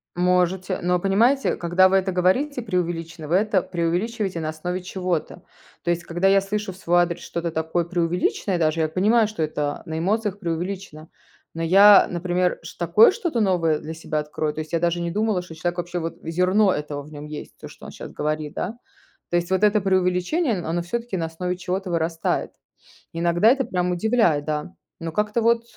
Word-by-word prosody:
Можете. 180 +1 +1
Но 180 0 +1
понимаете, 230 +9 +2
когда 175 +2 +3
вы 190 - +2
это 190 0 0
говорите, 250 +10 +1
преувеличено, 170 -5 -3
вы 165 - +1
это 200 -1 +2
преувеличиваете 180 +3 -2
на 155 - -2
основе 180 +4 -4
чего-то. 180 -3 -3 0.4
То - - -2
есть, 170 0 0
когда 175 +3 0
я 195 0 +5
слышу 205 +1 -3
в 185 - -13
свой 175 -1 +3
адрес 175 0 -1
что-то 170 0 -3
такое 160 +2 -1
преувеличенное, 175 +2 -1
даже 160 0 +1
я 155 - +1
понимаю, 215 +7 +3
что 210 -6 -6
это 150 -2 -2
на 160 - -4
эмоциях 205 +3 0
преувеличено, 175 -2 -5 0.5
но 165 - -3
я, 195 +4 +7
например, 180 +1 0
ш 165 - -10
такое 175 - +6
что-то 345 - -2
новое 170 -6 +2
для 160 - -7
себя 155 -1 -3
открою, 150 0 -3
то - - -7
есть 155 +2 -6
я 165 - +2
даже 170 +1 0
не 170 0 -2
думала, 210 -1 0
что 175 -2 -11
человек 175 +2 -3
вообще, 175 0 -3
вот, 165 0 -4
зерно 180 +4 +2
этого 145 -1 -4
в 150 - -14
нем 145 0 -8
есть, 150 0 -9
то, - - -9
что - - -14
он - - -8
щас - - -9
говорит, 150 0 -3
да. 225 +4 -4 0.5
То 175 - +1
есть 175 +1 -1
вот 190 +2 +1
это 210 0 +4
преувеличение, 190 - +1
оно 170 0 -2
всё-таки 230 +4 -4
на 165 - -1
основе 180 +3 -4
чего-то 185 +1 -3
вырастает. 165 -1 -1 0.6
Иногда 170 +5 +3
это 265 +1 +3
прям 180 -4 -1
удивляет, 175 -5 +2
да. 150 0 -3 0.3
Но 165 -1 -4
как-то 210 +3 0
вот. 230 +1 +3
180 Hz, 195 wpm, -23 LUFS, 165-195 Hz, 0.6 s, я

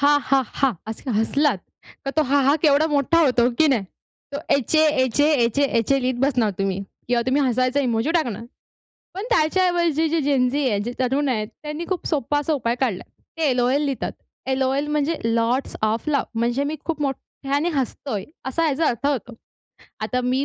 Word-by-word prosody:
हा! 290 +1 +5
हा! 270 0 +2
हा! 270 -2 0
असं 225 +4 -6
हसलात 230 +3 +1 0.5
तर - - 0
तो 310 - +5
हा! 280 0 +2
हा! 280 +3 +4
केवढा 295 0 +4
मोठा 295 +2 +2
होतो, 250 -4 +3
हो - - +2
की 315 - +5
नाही. 230 -8 +1 0.5
तो - - -1 0.2
एचए, 310 +4 +3 0.2
एचए, 290 +5 +2
एचए, 235 +5 +1 0.2
एचए 270 +5 +1
लिहीत 255 0 0
बसणार 245 -6 +2
तुम्ही 195 0 -1 0.3
किंवा 240 -1 +2
तुम्ही 280 +3 +2
हसायचा 255 +2 +1
इमोजी 240 +2 0
टाकणार. 240 - -1 0.7
पण 390 +3 -4
त्याच्याऐवजी 340 -3 +2
जी 320 +1 +1
जेनझी 275 0 +1
आहे, 205 -3 0
जे 235 +4 -4
तरुण 265 +3 +1
आहेत 215 -4 -1
त्यांनी 300 +3 -5
खूप 370 -3 -3
सोपा 290 -1 0
असा 295 +2 -1
उपाय 235 -5 0
काढला, 235 -9 0 0.3
ते 320 -3 +1
एल-ओ-एल 255 +3 +2
लिहितात. 275 -3 -2 0.4
एल-ओ-एल 265 +2 0
म्हणजे 300 +2 0
लॉट्स 230 +3 0
ओएफ 220 +6 -1
लाफ. 280 -3 +1
म्हणजे 240 +4 0
मी 310 - -4
खूप 320 -3 -3
मोठ्याने 280 +2 -2
हसतोय 255 -5 -3 0.2
असा 330 +5 0
ह्याचा 310 +1 +1
अर्थ 245 +2 -1
होतो. 250 -4 -2 0.7
आता 250 - -1
मी 255 +2 +1
275 Hz, 180 wpm, -22 LUFS, 245-295 Hz, 0.7 s, हा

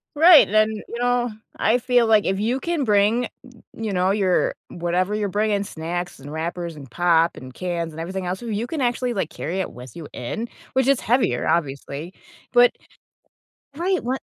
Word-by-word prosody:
Right. 325 +1 +8
Then, 215 +1 +3
you 220 +2 -7
know, 245 -1 +1 0.3
I 235 +3 +3
feel 245 -1 +3
like 215 -2 +4
if 190 0 0
you 235 +6 0
can 335 -3 -1
bring, 215 +2 +3 0.5
you 220 -3 -3
know, 185 +1 +2
your 195 -3 +2
whatever 180 +4 -1
you're 205 -2 -1
bringing- 205 0 +1
snacks 175 +1 -5
and 140 +2 -9
wrappers 170 +1 -4
and 140 -4 -11
pop 170 +2 +3
and 130 0 -10
cans 170 -3 -3
and 160 - -7
everything 185 +2 -4
else- 185 +5 -3
you 225 -1 -2
can 295 +2 -3
actually, 245 0 0
like, 190 -6 -2
carry 180 +5 -4
it 190 - -3
with 125 -1 -11
you 160 -4 -8
in, 220 - -4 0.3
which 260 -1 +2
is 275 -1 +3
heavier, 230 - +1
obviously. 145 +1 -2 0.4
But 245 0 +6 1.1
Right. 365 +3 0
What 260 +2 -1
200 Hz, 180 wpm, -23 LUFS, 170-240 Hz, 1.1 s, Right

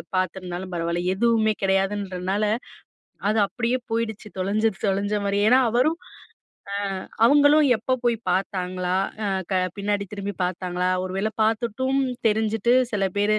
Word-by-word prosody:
பார்த்துருந்தாலும் 185 0 -3
பரவால்ல. 170 +1 -1
எதுவுமே 220 +1 +2
கிடையாதுன்றனால, 195 0 0 0.9
அது 215 0 +2
அப்படியே 245 +4 -1
போயிடுச்சு, 225 -2 -2
தொலைஞ்சது 205 +2 0
தொலைஞ்ச 200 +2 0
மாரி. 200 0 0
ஏன்னா 255 +1 +6
அவரும், 255 +8 +2 1.1
அ - - -13 0.2
அவங்களும் 290 +2 +5
எப்ப 255 +3 -1
போய் 235 -2 +2
பார்த்தாங்களா? 185 -1 -1 0.3
அ - - 0 0.3
க - - +2 0.2
பின்னாடி 200 0 -1
திரும்பி 200 -2 -5
பார்த்தாங்களா? 180 0 -1 0.2
ஒரு 185 - -6
வேள 215 +2 0
பார்த்துட்டும், 235 +5 0 0.3
தெரிஞ்சுட்டு 220 +2 +1 0.2
சில 200 -2 0 0.2
பேரு 215 +1 +3
205 Hz, 125 wpm, -24 LUFS, 185-225 Hz, 1.1 s, ஏன்னா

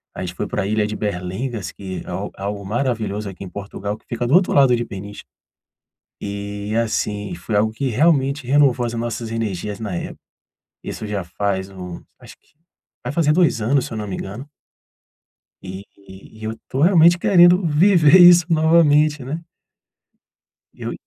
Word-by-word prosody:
A - - -6
gente 90 -1 -5
foi - - -3
pra 100 - -2
Ilha 105 0 0
de 105 - -5
Berlengas 105 +3 -4
que 95 -2 -7
é - - -10
algo - - -4
algo 100 +1 -5
maravilhoso 110 -3 -2
aqui 95 - -10
em 90 - -9
Portugal, 100 +1 -6
que - - -31
fica 120 0 -3
do 135 - 0
outro 185 0 +3
lado 135 -3 +5
de 120 - -2
Peniche. 100 +1 -9 1.0
E 100 +1 -5
assim, 105 -3 -3
foi 95 +5 -3
algo 110 +1 +2
que 135 +4 -2
realmente 140 0 +1
renovou 135 -3 +3
as 115 - -5
nossas 115 0 -4
energias 105 -3 -4
na 105 -4 -4
época. - - -7 0.6
Isso - - -6
já 100 -3 -3
faz 95 +2 -3
um 90 -2 -9 0.2
acho - - -14
que, - - -35 0.5
vai 125 - -3
fazer 150 -2 +2
2 170 -8 +2
anos 130 +4 +1
se - - -10
eu 110 - -5
não 105 - -5
me 95 - -4
engano 115 +10 -8 1.1
e 95 +1 -8
e 100 +2 -15
eu 110 +1 -4
tô 130 - -3
realmente 170 0 +5
querendo 175 0 +5
viver 165 +1 +5
isso 175 -2 +8
novamente, 155 -2 +3
né. 150 +5 -4 1.3
Eu - - -6
110 Hz, 170 wpm, -20 LUFS, 100-145 Hz, 1.3 s, isso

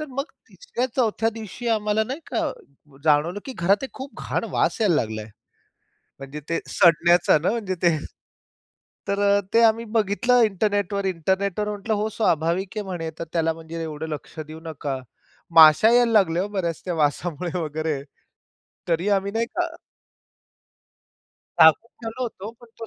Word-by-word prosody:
तर 305 - -4
मग 275 +2 -3 0.2
3-4 245 - -1
दिवशी 225 +1 -6
आम्हाला 215 -1 +1
नाही 265 +7 -5
का? 320 -3 -1 0.5
जाणवलं 160 +6 +2
की 265 - -6
घरात 195 +7 +2
एक 265 - -8
खूप 270 +1 -9
घाण - - -1
वास - - 0
यायला 205 -6 +3
लागलाय. 110 -3 -2 0.9
म्हणजे 135 +2 -7
ते, 165 - 0
सडण्याचा 170 0 +4
ना 170 - 0
म्हणजे 210 -5 -2
ते 170 -2 +4 1.1
तर 200 0 -1 0.2
अ, - - 0
ते 230 - +5
आम्ही 225 +1 +3
बघितलं 230 +4 +3
इंटरनेटवर. 205 -1 0
इंटरनेटवर 190 +3 -1
म्हटलं, 210 +1 -3
"हो 210 +1 -1
स्वाभाविक 175 -3 0
आहे 210 - -1
म्हणे 175 -4 -4
तर - - -2
त्याला 165 -1 +1
म्हणजे 165 +1 -8
एवढं 160 0 -5
लक्ष 155 +1 -7
देऊ 155 +1 -8
नका." 145 -4 -4 0.6
माश्या 160 +7 +8
यायला 240 -1 +4
लागल्या 185 -6 +3
हो - - -3
बऱ्याच, 180 -5 -3
त्या 180 - -2
वासामुळे 165 +3 -1
वगैरे 155 -2 -2 0.9
तरी 170 +4 +1
आम्ही 200 0 +1
नाही 230 +1 +1
का - - +1 1.9
झाकून 160 +9 +6
ठेवलं 225 +3 -5
होतो. 215 -3 -5
पण 240 - -15
तो 225 - -6
195 Hz, 150 wpm, -23 LUFS, 165-220 Hz, 1.9 s, माश्या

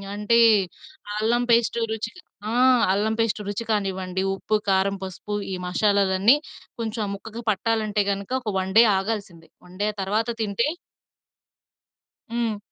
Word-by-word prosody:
అంటే 210 +3 +2 0.8
అల్లం 235 +3 +1
పేస్టు 230 0 +2
రుచిగా 230 +11 -6 0.3
ఆహ్, 250 0 +5
అల్లం 215 +2 0
పేస్ట్ 225 -2 +1
రుచి 205 +3 -3
కానివ్వండి, 190 -2 -1
ఉప్పు, 215 +2 -1
కారం, 195 +1 +2
పసుపు, 190 +2 -5 0.2
ఈ - - -1
మషాలాలన్నీ 200 +3 +3 0.4
కొంచెం 225 0 -3
ఆ - - -4
ముక్కకి 220 +3 -8
పట్టాలంటే 215 0 0
గనుక 200 +4 -5
ఒక 225 - -4
వన్ 190 0 -3
డే 230 - +10 0.2
ఆగాల్సిందే 195 -5 -5 0.2
వన్ 180 +1 -14
డే 210 - +2
తర్వాత 210 +4 0
తింటే 215 +4 0 1.7
హ్మ్. 230 -3 -1
210 Hz, 130 wpm, -24 LUFS, 195-230 Hz, 1.7 s, డే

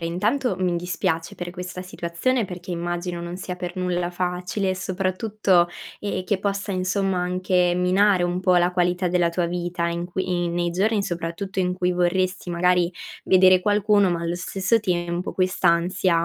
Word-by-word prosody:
intanto, 205 +9 0
mi 180 -2 0
dispiace 175 -1 -2
per 175 0 -6
questa 180 0 -7
situazione 185 +7 -1
perché 180 -1 -8
immagino 175 0 -3
non 170 +1 -5
sia 180 -1 -5
per 180 -1 -5
nulla 180 -1 -1
facile 180 +2 -2
e 185 - -2
soprattutto, 190 0 +1 0.3
ehm, 200 -2 -3
che 190 +1 0
possa 200 0 -2
insomma 190 0 0
anche 180 0 +1
minare 185 +1 +3
un 175 0 0
po' 185 0 +3
la 175 0 +4
qualità 180 0 +1
della 175 -1 +2
tua 170 +1 -1
vita 175 0 -2
in 170 0 -3
quei 180 -1 -1
nei 175 0 0
giorni 205 +4 +1
soprattutto, 175 +1 -4
in 180 -1 +1
cui 180 -1 0
vorresti 180 +1 0
magari 180 0 +2 0.3
vedere 185 0 +6
qualcuno 205 0 +3
ma 170 -1 -1
allo 170 +1 -2
stesso 190 +4 +1
tempo 175 -3 -2
quest'ansia 180 -1 +2
180 Hz, 165 wpm, -23 LUFS, 175-190 Hz, 0.3 s, vedere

